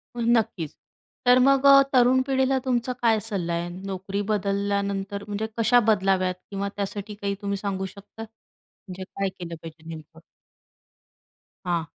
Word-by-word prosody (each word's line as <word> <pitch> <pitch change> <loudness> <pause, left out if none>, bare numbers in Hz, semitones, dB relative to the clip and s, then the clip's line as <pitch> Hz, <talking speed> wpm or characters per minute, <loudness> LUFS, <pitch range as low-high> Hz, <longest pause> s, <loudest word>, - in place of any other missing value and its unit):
हो, 240 - -3
नक्कीच. 225 -9 +1 0.5
तर 250 +1 +6
मग 275 0 +4
अ, 275 0 +9
तरुण 255 +1 +5
पिढीला 265 0 +2
तुमचा 250 0 0
काय 225 -2 +3
सल्ला 195 -6 -3
आहे 170 +1 -2
नोकरी 195 +2 -4
बदलल्यानंतर, 200 0 -1
म्हणजे 210 +1 -3
कशा 240 +2 +5
बदलाव्यात 190 -3 +2 0.2
किंवा 200 0 -2
त्यासाठी 205 +1 -4
काही 200 -1 -3
तुम्ही 200 -1 -2
सांगू 195 -1 -3
शकता? 200 +3 -10
म्हणजे 210 -3 -13
काय 195 +1 -3
केलं 170 -2 -6
पाहिजे 160 0 -11
नेमकं? 160 0 -10 1.5
हां. 170 -2 0
200 Hz, 140 wpm, -25 LUFS, 190-225 Hz, 1.5 s, अ